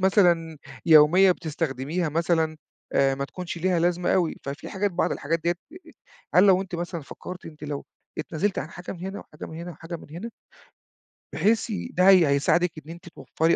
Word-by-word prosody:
مثلًا 175 Hz, -5 st, +3 dB, 0.3 s
يومية 165 Hz, +5 st, +7 dB
بتستخدمِيها 155 Hz, 0 st, -2 dB
مثلًا، 160 Hz, 0 st, +1 dB, 0.4 s
آآ 135 Hz, 0 st, +3 dB
ما 140 Hz, +1 st, -3 dB
تكونش 175 Hz, +3 st, -6 dB
ليها 180 Hz, 0 st, +1 dB
لازمة 175 Hz, +1 st, +1 dB
أوي. 175 Hz, -4 st, +1 dB
ففي 140 Hz, +3 st, -6 dB
حاجات، 200 Hz, +1 st, -1 dB
بعض 175 Hz, -, 0 dB
الحاجات 165 Hz, +3 st, -2 dB
ديّة 175 Hz, +1 st, +2 dB, 0.8 s
هل 180 Hz, -, +7 dB
لو 190 Hz, 0 st, +5 dB
أنتِ 185 Hz, -2 st, -8 dB
مثلًا 170 Hz, 0 st, -4 dB
فكرتِ 180 Hz, +5 st, -9 dB
أنتِ 155 Hz, -2 st, -10 dB
لو 145 Hz, -1 st, -4 dB, 0.3 s
اتنازلتِ 170 Hz, +5 st, -1 dB
عن 155 Hz, -, -4 dB
حاجة 175 Hz, +1 st, -7 dB
من 175 Hz, -, -11 dB
هنا 195 Hz, +1 st, -5 dB
وحاجة 150 Hz, -, -10 dB
من 160 Hz, -, -9 dB
هنا 175 Hz, +1 st, -6 dB
وحاجة 170 Hz, +1 st, -7 dB
من -, -, -13 dB
هنا 185 Hz, +9 st, -6 dB, 1.0 s
بحيث 220 Hz, +2 st, +1 dB, 0.2 s
ده 185 Hz, +2 st, +4 dB
هي 180 Hz, -5 st, +7 dB
هيساعدِك 160 Hz, +5 st, +2 dB
إن 160 Hz, -, -9 dB
أنتِ 175 Hz, +1 st, -11 dB
توفري 165 Hz, 0 st, 0 dB
170 Hz, 175 wpm, -25 LUFS, 155-180 Hz, 1.0 s, يومية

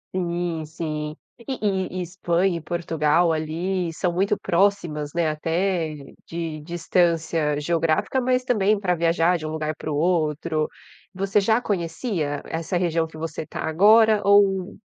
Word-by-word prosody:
Sim, 170 Hz, -3 st, -2 dB
sim. 155 Hz, -1 st, -4 dB, 0.2 s
E 240 Hz, +3 st, -5 dB
e 190 Hz, -2 st, -1 dB
e -, -, -1 dB
Espanha 175 Hz, 0 st, 0 dB
e -, -, -7 dB
Portugal 165 Hz, 0 st, +1 dB
ali 170 Hz, +3 st, -2 dB
são 175 Hz, +2 st, -1 dB
muito 190 Hz, +3 st, +1 dB
próximas, 170 Hz, -5 st, +1 dB
né, 170 Hz, -1 st, +1 dB
até 165 Hz, +1 st, -1 dB, 0.3 s
de 165 Hz, -2 st, -5 dB
distância 165 Hz, -2 st, 0 dB
geográfica, 165 Hz, -, +1 dB
mas 255 Hz, 0 st, +1 dB
também 210 Hz, -4 st, +2 dB
pra 180 Hz, -3 st, +1 dB
viajar 170 Hz, +1 st, +2 dB
de 155 Hz, -, -7 dB
um -, -, -3 dB
lugar 155 Hz, 0 st, -2 dB
para 155 Hz, -, -5 dB
o 145 Hz, -, -1 dB
outro. 155 Hz, -1 st, 0 dB, 0.5 s
Você 195 Hz, +2 st, +1 dB
já 220 Hz, +4 st, +2 dB
conhecia 170 Hz, -, -2 dB
essa 165 Hz, +2 st, -2 dB
região 170 Hz, -2 st, +1 dB
que 160 Hz, -1 st, -12 dB
você 160 Hz, -1 st, -5 dB
tá -, -, -8 dB
agora 210 Hz, +6 st, +5 dB
ou 195 Hz, -2 st, +3 dB
170 Hz, 150 wpm, -23 LUFS, 160-190 Hz, 0.5 s, agora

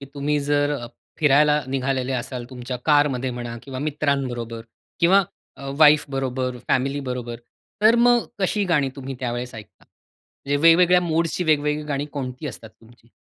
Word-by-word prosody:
की 140 Hz, -, -9 dB
तुम्ही 145 Hz, +1 st, 0 dB
जर 145 Hz, 0 st, +1 dB
अ, 120 Hz, -3 st, -7 dB, 0.3 s
फिरायला 150 Hz, 0 st, +4 dB
निघालेले 130 Hz, 0 st, -1 dB
असाल 125 Hz, 0 st, -4 dB
तुमच्या 125 Hz, 0 st, -6 dB
कारमध्ये 145 Hz, -4 st, +2 dB
म्हणा 120 Hz, -1 st, -6 dB
किंवा 130 Hz, -2 st, -7 dB
मित्रांबरोबर 135 Hz, -6 st, -2 dB, 0.4 s
किंवा 190 Hz, +4 st, +5 dB, 0.3 s
अ, 140 Hz, 0 st, -7 dB
वाईफ 150 Hz, -1 st, +6 dB
बरोबर, 130 Hz, -1 st, -2 dB
फॅमिली 135 Hz, +2 st, +1 dB
बरोबर. 125 Hz, -3 st, -5 dB, 0.5 s
तर 220 Hz, +2 st, +6 dB
मग 240 Hz, 0 st, +4 dB, 0.2 s
कशी 200 Hz, +2 st, +1 dB
गाणी 150 Hz, -7 st, +1 dB
तुम्ही 135 Hz, -1 st, -6 dB
त्यावेळेस 120 Hz, -1 st, -4 dB
ऐकता? 105 Hz, -3 st, -13 dB
म्हणजे 145 Hz, +1 st, -7 dB
वेगवेगळ्या 180 Hz, +2 st, +6 dB
मूड्सची 170 Hz, +1 st, -1 dB
वेगवेगळी 150 Hz, -1 st, +1 dB
गाणी 145 Hz, -1 st, -2 dB
कोणती 130 Hz, 0 st, -5 dB
असतात 115 Hz, -5 st, -8 dB
तुमची? 115 Hz, 0 st, -21 dB
140 Hz, 150 wpm, -22 LUFS, 125-150 Hz, 0.5 s, वाईफ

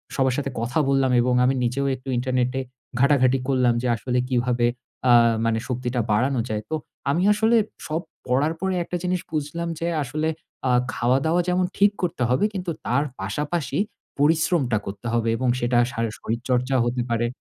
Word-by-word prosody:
সবার 130 Hz, -2 st, +2 dB
সাথে 140 Hz, -2 st, -2 dB
কথা 125 Hz, +6 st, -1 dB
বললাম 135 Hz, -1 st, +3 dB
এবং 125 Hz, +1 st, +1 dB
আমি 135 Hz, -, +2 dB
নিজেও 125 Hz, +3 st, 0 dB
একটু 130 Hz, +1 st, -10 dB
ইন্টারনেটে 125 Hz, +1 st, 0 dB, 0.4 s
ঘাঁটাঘাঁটি 135 Hz, -1 st, +4 dB
করলাম, 125 Hz, -3 st, +3 dB
যে 125 Hz, -, -1 dB
আসলে 125 Hz, +3 st, -1 dB
কিভাবে 120 Hz, -1 st, +1 dB, 0.4 s
আ -, -, +7 dB, 0.3 s
মানে 115 Hz, 0 st, +1 dB
শক্তিটা 125 Hz, 0 st, -2 dB
বাড়ানো 130 Hz, +5 st, +2 dB
যায়। 105 Hz, -1 st, -2 dB
তো 160 Hz, -, 0 dB, 0.3 s
আমি 170 Hz, +6 st, +2 dB
আসলে 220 Hz, +2 st, +3 dB, 0.3 s
সব 160 Hz, +2 st, -1 dB, 0.3 s
পড়ার 140 Hz, +6 st, +2 dB
পরে 190 Hz, 0 st, -1 dB
একটা 175 Hz, -, -3 dB
জিনিস 180 Hz, -1 st, 0 dB
বুঝলাম 155 Hz, +3 st, -3 dB
যে 170 Hz, -, -1 dB, 0.2 s
আসলে 155 Hz, +5 st, -2 dB, 0.4 s
আ -, -, +3 dB, 0.2 s
খাওয়া-দাওয়া 135 Hz, +8 st, +2 dB
যেমন 180 Hz, 0 st, +2 dB
ঠিক 200 Hz, 0 st, +5 dB
করতে 170 Hz, -8 st, -1 dB
হবে 130 Hz, +11 st, +3 dB
কিন্তু 180 Hz, -3 st, -3 dB
তার 140 Hz, +4 st, +2 dB, 0.2 s
পাশাপাশি 150 Hz, -1 st, -2 dB, 0.4 s
পরিশ্রমটা 150 Hz, -5 st, +2 dB
করতে 100 Hz, +4 st, -6 dB
হবে 115 Hz, -1 st, +1 dB
এবং 130 Hz, -1 st, 0 dB
সেটা 120 Hz, 0 st, +1 dB
শা 125 Hz, -, -7 dB, 0.2 s
শরীরচর্চা 125 Hz, +3 st, -1 dB
হতে 120 Hz, +1 st, -1 dB
পারে 115 Hz, 0 st, +1 dB
130 Hz, 165 wpm, -24 LUFS, 125-155 Hz, 0.4 s, আ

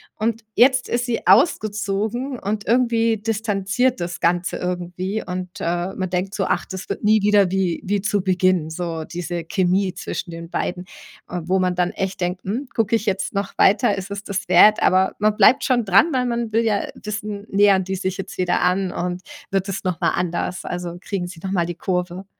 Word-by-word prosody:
Und 225 Hz, +1 st, -2 dB
jetzt 255 Hz, +2 st, +4 dB
ist 240 Hz, +1 st, -1 dB
sie 230 Hz, -6 st, -2 dB
ausgezogen 215 Hz, -, +1 dB
und 205 Hz, +1 st, -3 dB
irgendwie 230 Hz, -1 st, +2 dB
distanziert 215 Hz, +3 st, 0 dB
das 175 Hz, 0 st, -4 dB
Ganze 175 Hz, +1 st, +1 dB
irgendwie 180 Hz, +3 st, -3 dB
und, 180 Hz, 0 st, -4 dB
äh, 175 Hz, +2 st, -2 dB
man 185 Hz, -1 st, -3 dB
denkt 185 Hz, +2 st, -2 dB
so: 195 Hz, -, 0 dB
„Ach, -, -, 0 dB
das 190 Hz, 0 st, -7 dB
wird -, -, -5 dB
nie 215 Hz, 0 st, +4 dB
wieder 200 Hz, -2 st, +4 dB
wie 190 Hz, -3 st, 0 dB
wie 200 Hz, +1 st, -1 dB
zu 205 Hz, 0 st, 0 dB
Beginn, 185 Hz, -3 st, +1 dB
so 165 Hz, -1 st, -4 dB
diese 175 Hz, +1 st, -5 dB
Chemie 185 Hz, +2 st, +1 dB
zwischen 185 Hz, -1 st, -5 dB
den 165 Hz, 0 st, -8 dB
beiden.“ 180 Hz, +1 st, -3 dB, 0.4 s
Äh, 180 Hz, -, -3 dB
wo 185 Hz, +3 st, +1 dB
man 180 Hz, -1 st, +1 dB
dann 180 Hz, 0 st, +1 dB
echt 190 Hz, 0 st, -4 dB
denkt: 180 Hz, +1 st, -2 dB
„Hm, 245 Hz, +8 st, -3 dB
guck 225 Hz, -1 st, 0 dB
ich 225 Hz, -1 st, +2 dB
jetzt 195 Hz, -2 st, -1 dB
noch 200 Hz, 0 st, -3 dB
weiter, 205 Hz, +1 st, +4 dB
ist 195 Hz, +1 st, -6 dB
es 200 Hz, 0 st, -5 dB
das 205 Hz, 0 st, -4 dB
wert?“ 215 Hz, 0 st, +6 dB
Aber 190 Hz, 0 st, +3 dB
man 210 Hz, 0 st, +2 dB
bleibt 260 Hz, +6 st, +5 dB
schon 245 Hz, -2 st, +2 dB
dran, 200 Hz, -, +5 dB
weil 255 Hz, -1 st, +1 dB
man 235 Hz, -2 st, -2 dB
will 225 Hz, +1 st, +3 dB
ja, 210 Hz, -3 st, +1 dB
äh, -, -, -7 dB
wissen, 210 Hz, -1 st, -5 dB
nähern 200 Hz, -1 st, +4 dB
die 190 Hz, +1 st, -3 dB
sich 190 Hz, 0 st, -3 dB
jetzt 195 Hz, -, -7 dB
wieder 180 Hz, -1 st, +1 dB
an 180 Hz, +1 st, +1 dB
und 180 Hz, 0 st, -3 dB, 0.3 s
wird 195 Hz, 0 st, 0 dB
es 195 Hz, 0 st, -4 dB
nochmal 180 Hz, -3 st, 0 dB
anders? 175 Hz, +1 st, -2 dB
Also, 175 Hz, -1 st, -5 dB
kriegen 190 Hz, -3 st, -3 dB
sie 175 Hz, -2 st, -10 dB
noch 190 Hz, -, -3 dB
mal 175 Hz, -3 st, +1 dB
die 175 Hz, -, -4 dB
Kurve? 180 Hz, +1 st, -3 dB
195 Hz, 205 wpm, -21 LUFS, 180-215 Hz, 0.4 s, wert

